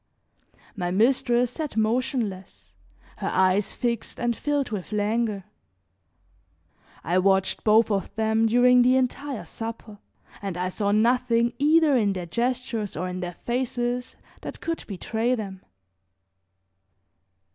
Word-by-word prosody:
My 180 -4 -2
mistress 240 +4 +2
sat 300 -4 -5
motionless, 220 -3 -2 0.4
her - - -4
eyes 190 +2 +2
fixed 235 -3 -3
and 240 -1 0
filled 290 -2 -1
with 205 -2 -5
languor. 210 -1 0 1.6
I 175 +4 +1
watched 190 0 +2
both 220 +1 +4
of 195 -2 -1
them 220 +1 +2
during 245 +2 +5
the 250 +1 +4
entire 260 0 -1
supper 225 -2 -7 0.4
and 195 -3 -4
I 180 +1 -1
saw 200 +2 -1
nothing 235 +2 +2
either 305 0 +4
in 210 -5 +2
their 180 -2 -5
gestures 235 0 -2
or 180 +3 -2
in 180 0 -5
their 175 -1 -5
faces 245 0 -2 0.3
that - - -7
could 330 0 -4
betray 225 +5 -1
them. 195 -5 -6
225 Hz, 125 wpm, -25 LUFS, 200-250 Hz, 1.6 s, during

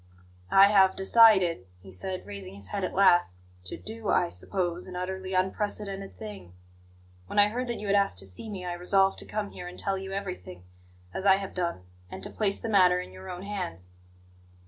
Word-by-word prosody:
"I 195 +1 +7
have 190 -2 +5
decided," 190 - +5
he 95 +1 -14
said, 185 - -5
raising 100 -2 -8
his 100 -1 -12
head 200 - -3
at 185 - -3
last, 175 - +4 0.3
"to - - -6
do, 220 -1 -7
I 175 -1 +3
suppose, 180 -2 -3
an 185 - -8
utterly 190 +1 -4
unprecedented 195 +1 -2
thing. 205 - -9 0.7
When - - -6
I 205 0 +6
heard 250 +3 -3
that 235 - -3
you 210 - -6
had 200 0 +2
asked 200 - +2
to 95 - -6
see 95 - -6
me, 190 -3 -6
I 175 - -3
resolved 195 +2 +2
to - - -4
come 210 -1 -3
here 180 - -8
and 180 - -9
tell 195 -1 -2
you 190 0 -7
everything, 180 - -6 0.5
as - - -4
I 195 -1 +6
have 195 0 -5
done, 170 - -2 0.3
and - - -9
to - - -4
place 200 -2 0
the - - -5
matter 185 -4 +5
in 180 - -7
your 190 0 -10
own 180 0 -6
hands." 95 - -5
190 Hz, 205 wpm, -28 LUFS, 175-200 Hz, 0.7 s, I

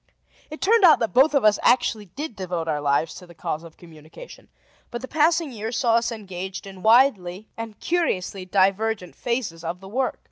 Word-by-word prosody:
It 310 - -9
turned 440 +2 +3
out 335 -4 +8
that 230 - -2
both 275 +4 +4
of 275 - +3
us 210 -1 +4
actually 220 -4 +2
did 280 - -7
devote 180 -4 -4
our 150 -2 -1
lives 145 +2 +1
to 180 - -12
the 170 - -15
cause 155 0 -4
of 165 -1 -14
communication; 160 - -14 0.4
but 240 - -6
the - - -5
passing 320 0 +2
years 225 +1 -4
saw 235 -2 +2
us 235 +1 -1
engaged 190 -4 -7
in 190 -1 -11
widely 220 -5 +3
and 225 -2 -8
curiously 200 - -1
divergent 195 +1 0
phases 235 -9 -3
of 170 +2 -4
the 190 - -12
work. 255 +6 -1
210 Hz, 190 wpm, -23 LUFS, 180-255 Hz, 0.4 s, out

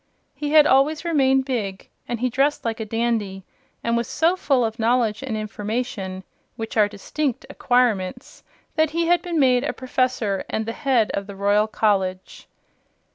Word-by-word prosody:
He 295 0 -4
had 305 -1 +8
always 300 +4 +3
remained 270 -5 +3
big, 210 -8 -3 0.2
and 240 -1 -4
he 255 - +1
dressed 275 +3 +1
like 225 -1 -2
a 220 - -3
dandy 215 -4 -2 0.4
and 235 0 +1
was 235 0 -1
so 330 +4 +2
full 270 -9 +1
of 225 +1 -4
knowledge 230 -1 +1
and 250 -5 -3
information 210 -2 -4 0.3
(which 225 0 -6
are 210 -2 +4
distinct 235 +6 -3
acquirements) 245 -2 0 0.3
that 315 -1 +3
he 335 - +2
had 350 +1 +3
been 340 -3 -2
made 255 -2 +4
a 295 - -2
Professor 255 -6 -1
and 220 - -2
the 225 - -3
head 250 -6 +1
of 200 0 -3
the 200 - -8
Royal 205 +2 +2
College. 190 -4 -1
235 Hz, 170 wpm, -23 LUFS, 210-270 Hz, 0.4 s, had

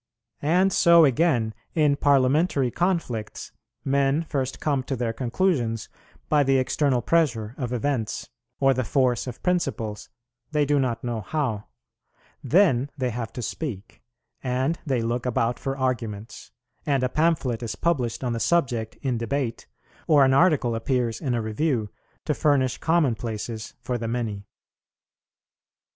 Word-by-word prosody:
And 180 +6 +3
so, 170 -1 +6
again, 125 -5 +2 0.2
in 150 -3 +3
Parliamentary 140 0 +2
conflicts, 165 - -2 0.3
men 140 +3 +2
first 135 -4 -3
come 145 -3 0
to 135 - -2
their 115 -2 -2
conclusions 120 - -1 0.4
by 150 -1 +3
the 135 -1 +3
external 130 -1 +1
pressure 120 -10 +1
of 125 -4 -4
events 125 -3 -2 0.3
or 135 0 +4
the 130 0 -1
force 125 +1 +1
of 125 - -8
principles, 125 - -1 0.4
they 150 -1 +2
do 145 0 +2
not 125 -4 -1
know 120 -2 -2
how; 115 -3 -2 0.8
then 145 -3 +3
they 130 -2 -1
have 115 -1 -4
to 125 - -5
speak, 105 - -6 0.4
and 130 +6 -1
they 130 -4 +1
look 120 +2 -2
about 120 0 0
for 135 0 -3
arguments: 115 - -3 0.3
and 140 -3 +1
a - - +3
pamphlet 145 -5 0
is 115 -3 -4
published 135 -9 -1
on 125 -2 -1
the 115 - -2
subject 120 -7 0
in 125 -4 0
debate, 120 0 -3 0.4
or 145 -3 +6
an 130 - +3
article 140 -6 +3
appears 115 0 -1
in 130 -6 -1
a 115 - -1
Review, 110 0 -1 0.4
to - - +1
furnish 135 -4 +1
common 160 -6 +2
places 110 0 -5
for 125 -1 -3
the 115 - -3
many. 110 -4 -3
130 Hz, 145 wpm, -25 LUFS, 115-145 Hz, 0.8 s, so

